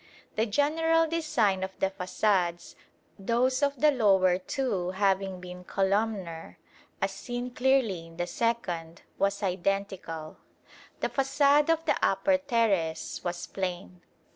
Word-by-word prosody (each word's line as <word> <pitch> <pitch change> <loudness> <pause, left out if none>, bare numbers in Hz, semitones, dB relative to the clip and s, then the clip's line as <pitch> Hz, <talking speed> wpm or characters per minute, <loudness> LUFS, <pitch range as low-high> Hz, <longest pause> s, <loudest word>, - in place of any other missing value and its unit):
The 220 +2 +1
general 325 +7 +2
design 295 - +1
of 190 0 -5
the 195 - 0
façades, 185 -2 0 0.5
those 245 +6 +1
of 280 -2 +1
the 300 0 +5
lower 190 -7 +3
two 195 -4 -2
having 190 -1 0
been 180 0 -9
columnar, 195 -3 -1 0.4
as - - 0
seen 245 0 -5
clearly 245 -10 +1
in 165 0 -16
the 175 - -1
second, 175 -7 -2 0.2
was 200 +1 0
identical. 185 -4 -2 0.6
The - - 0
façade 285 +2 +3
of 325 0 +2
the - - +2
upper 285 -1 +3
terrace 205 - 0
was 175 0 -3
plain. 180 -1 -5
200 Hz, 125 wpm, -28 LUFS, 180-255 Hz, 0.6 s, the